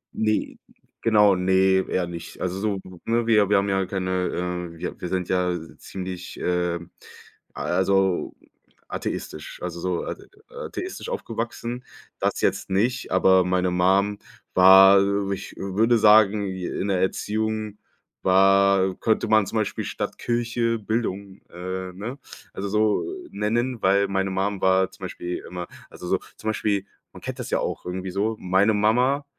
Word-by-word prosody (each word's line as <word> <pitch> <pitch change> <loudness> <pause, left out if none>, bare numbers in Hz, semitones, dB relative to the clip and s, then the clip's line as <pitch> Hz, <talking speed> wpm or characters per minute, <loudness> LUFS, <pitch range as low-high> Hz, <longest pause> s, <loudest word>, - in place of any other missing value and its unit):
Ne 110 -1 0 0.4
genau, 105 -3 +5
ne, 95 +1 +3
eher 90 -2 0
nicht. 85 -1 -8
Also 90 +1 -2
so, 100 -2 -1 0.3
ne 115 0 +1
wir 105 -3 +4
wir 105 - +5
haben 100 +1 +1
ja 95 0 +1
keine 95 -1 -2 0.6
äh, 85 - -13
wir 90 - -6
wir - - -3
sind 90 -1 -1
ja 90 -1 +1 0.3
ziemlich, 90 -1 -7
ähm 90 -1 -1 0.6
also 95 0 +1 0.6
atheistisch 75 - -5
also 85 - -4
so 90 0 -2
a - - -4 0.5
atheistisch - - -6
aufgewachsen. 120 +2 -4 0.4
Das - - -1
jetzt - - 0
nicht, 120 +7 0
aber 95 0 +5
meine 90 0 +1
Mum 95 +3 +2 0.3
war, 95 +1 +8 0.3
ich 100 0 -5
würde 110 +5 +2
sagen, 105 -1 +5
in 95 +1 -3
der 95 -2 +1
Erziehung 110 +2 -2 0.4
war 95 0 +4
könnte 110 -1 +1
man 110 -2 +4
zum 115 - -3
Beispiel 110 -2 -1
statt - - -4
Kirche, 120 -1 0
Bildung, 100 -3 -3
äh, 95 +1 -5
ne, 115 +9 -6 0.3
also 100 +1 -4
so 105 +1 +2 0.3
nennen, 115 +3 -1
weil 100 +1 +3
meine 95 0 -1
Mum 95 +1 -1
war 95 0 +3
zum - - -9
Beispiel 90 0 -5
immer 90 -1 -6 0.2
also - - -9
so - - +1 0.2
zum 110 - -3
Beispiel, 100 -2 0 0.3
man - - -12
kennt - - -6
das - - -5
ja - - +1
auch - - -3
irgendwie 90 +1 -4
so, 105 +4 -1
meine 95 +4 +2
Mama 125 +7 +2
95 Hz, 150 wpm, -24 LUFS, 95-110 Hz, 0.6 s, war